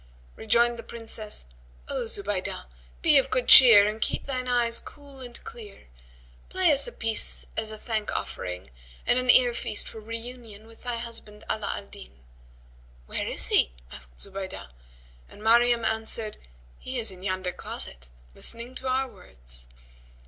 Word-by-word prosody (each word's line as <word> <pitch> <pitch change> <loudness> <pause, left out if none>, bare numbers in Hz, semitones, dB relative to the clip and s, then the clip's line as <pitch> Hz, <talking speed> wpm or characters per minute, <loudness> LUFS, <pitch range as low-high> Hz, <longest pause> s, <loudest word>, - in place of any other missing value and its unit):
Rejoined 235 +2 +2
the - - -4
Princess, 225 - -3 0.4
"O 235 - -3
Zubaydah, 200 -3 -3 0.4
be 300 -4 +6
of 270 - -2
good 255 -2 0
cheer 230 -6 +10
and 215 +1 -3
keep - - -1
thine 255 -2 -3
eyes 240 -1 +2
cool 285 -2 -14
and 245 -2 -9
clear; 210 - -12 0.6
play 370 -3 +4
us 285 - +1
a - - -7
piece 225 - 0
as 220 0 -2
a 215 - -7
thank 215 -1 -3
offering 90 -7 -5 0.3
and 250 - +3
an 255 0 -3
ear 245 -1 +6
feast 215 - +1
for 220 - -6
reunion 230 -1 -8
with 225 0 -18
thy 245 -1 -3
husband 230 -3 -8
Ala 215 -2 -3
al - - -8
Din." 65 - -14 0.8
"Where - - -4
is - - +3
he?" - - +3 0.2
asked 60 0 -11
Zubaydah, 190 - -5 0.6
and 210 - -14
Maryam 235 +1 +4
answered, 220 0 0 0.4
"He 255 - -6
is 225 -4 +3
in 185 -1 -13
yonder 185 -1 -2
closet 65 - -6 0.3
listening 235 - -7
to 260 - -6
our 260 +1 0
words." - - -5
225 Hz, 155 wpm, -26 LUFS, 200-245 Hz, 0.8 s, cheer